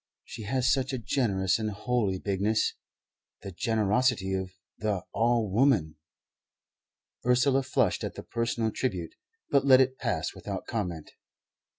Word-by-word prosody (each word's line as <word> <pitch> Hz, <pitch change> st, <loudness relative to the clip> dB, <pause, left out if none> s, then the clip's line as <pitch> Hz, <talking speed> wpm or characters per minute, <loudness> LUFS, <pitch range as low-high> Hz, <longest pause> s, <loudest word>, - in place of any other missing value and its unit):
She 110 Hz, -, -8 dB
has 130 Hz, +3 st, 0 dB
such 135 Hz, 0 st, -1 dB
a -, -, 0 dB
generous 100 Hz, -6 st, 0 dB
and 110 Hz, -1 st, -1 dB
holy 105 Hz, -2 st, -1 dB
bigness 100 Hz, +3 st, 0 dB, 0.7 s
the 100 Hz, -, -6 dB
generosity 105 Hz, +1 st, +1 dB
of 95 Hz, -1 st, -2 dB, 0.3 s
the 105 Hz, -3 st, -1 dB
All 115 Hz, -1 st, +2 dB
woman." 100 Hz, -, +2 dB, 1.3 s
Ursula 125 Hz, +2 st, +3 dB
flushed 130 Hz, -, 0 dB
at -, -, -4 dB
the -, -, -7 dB
personal 115 Hz, -1 st, -1 dB
tribute, 95 Hz, -11 st, -3 dB, 0.4 s
but 140 Hz, -, +4 dB
let 130 Hz, -2 st, +7 dB
it 130 Hz, 0 st, +2 dB
pass -, -, -1 dB
without -, -, -6 dB
comment. 90 Hz, -8 st, -4 dB
110 Hz, 130 wpm, -28 LUFS, 95-125 Hz, 1.3 s, let